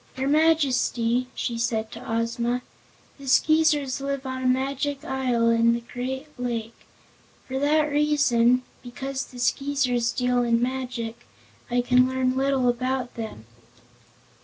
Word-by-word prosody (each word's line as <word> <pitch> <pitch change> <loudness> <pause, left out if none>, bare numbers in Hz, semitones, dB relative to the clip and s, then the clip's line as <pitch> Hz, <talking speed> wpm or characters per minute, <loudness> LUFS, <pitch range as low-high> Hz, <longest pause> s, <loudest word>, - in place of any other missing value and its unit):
"Your 265 +1 -1
Majesty," 260 -6 +2
she 235 -2 -3
said 225 -2 -1
to - - -9
Ozma, 235 +2 -1 0.6
"the 275 - -10
Skeezers 295 -1 +3
live 275 0 -3
on 260 0 -4
a 255 - 0
Magic 275 +2 -1
Isle 250 -3 +1
in 230 0 +4
a - - -2
great 260 +3 -4
lake. 230 -2 -3 0.7
For 265 0 -3
that 295 +2 +3
reason 280 -5 +3 0.2
because 265 +2 -5
the 250 - -14
Skeezers 250 -2 +1
deal 250 0 +1
in 235 -1 +2
magic 245 -2 -4 0.4
I 245 0 +2
can 250 +1 +4
learn 260 0 0
little 270 -1 +1
about 255 +1 -1
them." 220 - -7
255 Hz, 135 wpm, -25 LUFS, 240-275 Hz, 0.7 s, in